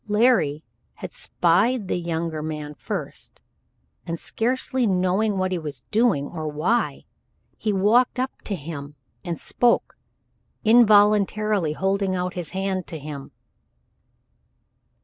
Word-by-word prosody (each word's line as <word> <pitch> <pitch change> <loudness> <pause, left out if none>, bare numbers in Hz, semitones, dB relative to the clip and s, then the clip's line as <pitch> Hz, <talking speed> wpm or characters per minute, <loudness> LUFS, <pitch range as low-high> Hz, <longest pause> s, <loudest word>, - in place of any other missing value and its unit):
Larry 210 - +3 0.3
had - - -8
spied 200 +6 +1
the 180 - -1
younger 165 -2 -3
man 150 -1 -5
first, - - -6 0.7
and, 165 0 -3
scarcely 255 +1 0
knowing 190 +2 +1
what 185 0 0
he 180 - -1
was 150 -3 -6
doing, 215 - +2
or 155 0 -5
why, 165 +11 0 0.5
he 215 - -1
walked 215 +7 +3
up 260 +1 -1
to 205 - -2
him, 145 -3 -7 0.3
and 170 -3 -4
spoke, 240 -1 +1 0.7
involuntarily 210 -5 +4
holding 195 +2 0
out 180 0 -2
his 175 -4 -4
hand 190 -1 -2
to 165 - -6
him. 145 -2 -8
185 Hz, 120 wpm, -24 LUFS, 160-215 Hz, 0.7 s, involuntarily